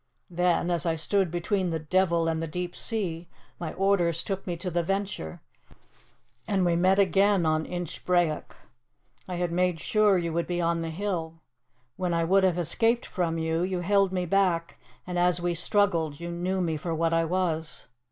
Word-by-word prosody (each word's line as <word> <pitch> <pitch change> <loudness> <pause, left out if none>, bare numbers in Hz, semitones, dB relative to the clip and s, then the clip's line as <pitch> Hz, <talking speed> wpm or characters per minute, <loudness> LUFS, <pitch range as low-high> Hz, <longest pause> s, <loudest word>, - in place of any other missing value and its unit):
"Then, 175 0 +1
as 170 -3 0
I 165 - +1
stood 190 +3 +1
between 175 +2 -1
the 165 - -1
devil 170 +1 +1
and 160 0 -1
the 165 - -3
deep 180 +3 -4
sea, 175 -7 -3 0.3
my 165 -3 -4
orders 180 -4 +1
took 195 0 -4
me 175 -1 -2
to 180 +1 -4
the 175 +1 +1
Venture, 195 - -3 1.1
and 195 -3 +1
we 170 -1 +2
met 185 +3 +3
again 195 -1 +3
on 155 0 +1
Inchbrayock. 175 -1 -1 0.7
I 180 - -4
had 175 -1 -1
made 180 -1 +1
sure 210 0 +3
you 170 -2 -2
would 170 +1 -1
be 175 -1 -2
on 170 -1 +1
the 165 - -3
hill. 165 -2 -4 0.5
When 180 -2 -1
I 165 - +1
would 190 +3 +3
have 180 -2 +2
escaped 225 +8 +1
from 170 -3 -2
you, 160 +1 0
you 180 0 -1
held 195 +1 +2
me 180 -1 -1
back, 175 -2 +1 0.3
and 180 -1 -2
as 180 0 +3
we 175 0 0
struggled 170 -4 +1
you 170 0 -5
knew 180 +2 -1
me 165 -3 -1
for 165 +2 -3
what 165 +1 +1
I 165 0 +3
was. 165 -2 -2
175 Hz, 185 wpm, -27 LUFS, 165-185 Hz, 1.1 s, met